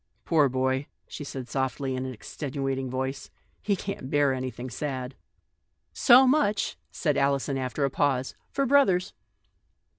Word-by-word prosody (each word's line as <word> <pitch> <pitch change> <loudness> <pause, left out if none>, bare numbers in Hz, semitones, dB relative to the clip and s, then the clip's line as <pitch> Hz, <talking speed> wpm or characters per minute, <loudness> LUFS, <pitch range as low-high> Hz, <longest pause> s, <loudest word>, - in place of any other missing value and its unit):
" - - -44
Poor 150 -5 +4
boy," 130 +2 0 0.2
she - - -7
said 135 -3 -6
softly, 130 0 -2
in 130 0 -3
an - - -4
extenua 135 +2 -4
ting 135 -1 -3
voice, 130 +2 -3 0.2
" - - -40
he 205 - +1
can't 190 -8 -5
bear 145 -2 +3
anything 130 -1 -4
sad! 130 -1 -4 0.3
" - - -50
" - - -49 0.2
So 255 +2 +10
much," 255 -6 +2
said 150 -4 -1
Alison 140 0 +1
after 130 +2 -1
a 135 - -1
pause, 135 -2 0
" - - -43
for 275 - 0
brothers." 240 -10 +3
135 Hz, 175 wpm, -27 LUFS, 130-155 Hz, 0.3 s, So